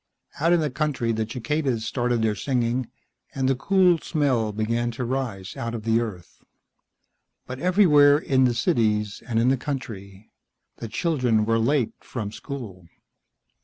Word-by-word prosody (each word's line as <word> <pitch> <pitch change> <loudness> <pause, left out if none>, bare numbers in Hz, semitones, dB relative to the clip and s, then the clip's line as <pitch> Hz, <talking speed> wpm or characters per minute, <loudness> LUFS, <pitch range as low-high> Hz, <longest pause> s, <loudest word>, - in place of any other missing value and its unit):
Out 165 +3 +2
in 175 -1 +4
the 150 -3 -1
country 130 -4 -1
the 110 0 -2
cicadas 125 -1 -2
started 120 -2 0
their 110 -1 +2
singing, 125 +1 -1 0.5
and 135 -1 0
the 135 - +3
cool 180 +4 +3
smell 130 -10 0
began 115 +3 -1
to 120 +1 -4
rise 115 -7 -4
out 115 0 -4
of 110 - -6
the 115 +1 +2
earth. 100 -7 -8 1.0
But 130 +1 -7
everywhere, 155 -6 +5
in 130 -3 +2
the 120 -1 +1
cities 105 -3 0
and 115 -2 -1
in 115 +3 +3
the 135 - +2
country, 110 -8 -7 0.5
the 115 - -6
children 125 -5 +1
were 115 +1 +2
late 125 +1 +1
from 110 -5 -5
school. 105 - -8
120 Hz, 155 wpm, -24 LUFS, 110-140 Hz, 1.0 s, everywhere